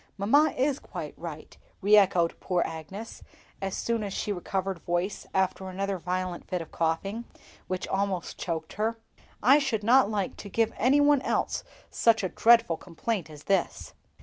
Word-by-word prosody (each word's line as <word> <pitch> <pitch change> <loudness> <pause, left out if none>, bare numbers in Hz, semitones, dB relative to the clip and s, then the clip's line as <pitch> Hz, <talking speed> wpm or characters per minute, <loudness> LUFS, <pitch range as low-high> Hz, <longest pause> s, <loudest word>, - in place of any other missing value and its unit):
"Mamma 285 +11 +4
is 275 +2 +1
quite - - -7
right," - - -8 0.2
re 205 +1 +5
echoed 180 -4 +3
poor 180 -2 0
Agnes, 175 +8 -7 0.4
as 195 -1 -2
soon 230 -2 -1
as 200 - -4
she 205 - -2
recovered 190 0 -2
voice 175 +4 -2
after 190 0 0
another 195 0 -2
violent 180 0 -3
fit 180 - -1
of 165 - -8
coughing, 195 +8 -1 0.4
which 185 0 -3
almost 190 -2 -2
choked 160 -2 -4
her. 225 +1 0 0.5
"I 270 +6 +7
should 250 -7 -1
not 240 -1 +5
like 205 -3 -2
to 200 - -8
give 225 +2 +1
any 260 +5 +3
one 290 -1 +5
else - - -1 0.3
such 225 -3 +3
a 185 - 0
dreadful 230 -3 +4
complaint 180 +1 -4
as 150 -1 -12
this." 195 -3 -1
195 Hz, 165 wpm, -28 LUFS, 180-225 Hz, 0.5 s, I